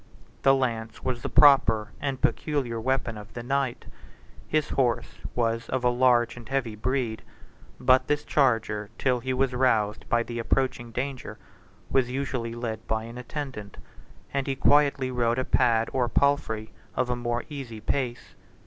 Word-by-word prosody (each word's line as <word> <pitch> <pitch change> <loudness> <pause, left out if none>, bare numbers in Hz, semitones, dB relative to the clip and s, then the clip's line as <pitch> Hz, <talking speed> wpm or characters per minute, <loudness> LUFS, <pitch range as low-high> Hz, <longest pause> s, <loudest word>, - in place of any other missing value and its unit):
The 135 0 +5
lance 115 -4 -2
was 125 -2 -2
the - - -3
proper 130 -7 +5
and 135 -2 -2
peculiar 130 -8 -1
weapon 120 -3 -1
of 105 +1 -12
the 120 - -5
knight: 135 -1 -1 0.6
his 155 -1 0
horse 125 -3 0 0.2
was 115 -1 0
of 130 -1 -1
a 125 - +4
large 120 -1 +3
and 120 -1 -11
heavy 130 -5 -1
breed; 115 -1 -1 0.6
but 130 0 +4
this 150 0 0
charger, 110 -6 +1
till 125 -2 +1
he 130 +2 -3
was 130 0 +1
roused 110 -5 +1
by 120 0 +3
the 120 0 -5
approaching 125 0 0
danger, 125 -2 -4 0.5
was 130 -2 +2
usually 125 -3 -3
led 115 -2 -5
by 110 0 -1
an 115 +2 -8
attendant, 125 -6 -6 0.6
and 140 0 -1
he 135 - 0
quietly 140 -1 +3
rode 120 -1 +1
a 130 - 0
pad 115 -2 +3
or 125 -2 +1
palfrey 110 -5 +1 0.2
of 125 -1 0
a - - +1
more 120 0 -2
easy 135 -7 -7
pace. 120 +2 -3
125 Hz, 160 wpm, -26 LUFS, 115-135 Hz, 0.6 s, The